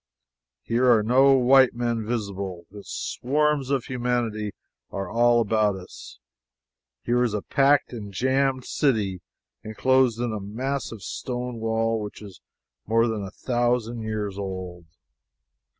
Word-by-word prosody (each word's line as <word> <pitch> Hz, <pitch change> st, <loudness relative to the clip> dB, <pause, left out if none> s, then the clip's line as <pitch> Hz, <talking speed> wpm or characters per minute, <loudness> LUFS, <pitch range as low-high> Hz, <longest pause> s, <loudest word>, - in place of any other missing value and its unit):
Here 125 Hz, +2 st, +3 dB
are 110 Hz, -3 st, +4 dB
no 130 Hz, +5 st, +5 dB
white 130 Hz, 0 st, +5 dB
men 120 Hz, -2 st, -1 dB
visible, 100 Hz, -6 st, -4 dB
yet 100 Hz, -1 st, -11 dB
swarms 145 Hz, +1 st, 0 dB
of 135 Hz, -3 st, +1 dB
humanity 120 Hz, -4 st, -2 dB, 0.4 s
are 95 Hz, -1 st, -4 dB
all 120 Hz, +4 st, +3 dB
about 105 Hz, -2 st, +2 dB
us. 95 Hz, -1 st, -11 dB, 0.9 s
Here 125 Hz, +1 st, +2 dB
is 115 Hz, -4 st, 0 dB
a 105 Hz, -, -3 dB
packed 140 Hz, -1 st, +2 dB
and 105 Hz, -4 st, -7 dB
jammed 130 Hz, +3 st, 0 dB
city 105 Hz, -, 0 dB, 0.4 s
enclosed 120 Hz, +2 st, +2 dB
in 120 Hz, -2 st, -1 dB
a 105 Hz, -, -3 dB
massive 115 Hz, +1 st, -4 dB
stone 125 Hz, -1 st, -4 dB
wall 115 Hz, 0 st, 0 dB
which 105 Hz, -1 st, -7 dB
is 100 Hz, -3 st, -12 dB, 0.5 s
more 115 Hz, +2 st, +3 dB
than 110 Hz, -2 st, -2 dB
a 95 Hz, -, -5 dB
thousand 120 Hz, 0 st, -1 dB
years 105 Hz, -3 st, -3 dB
old. 95 Hz, -3 st, -6 dB
115 Hz, 135 wpm, -25 LUFS, 105-125 Hz, 0.9 s, no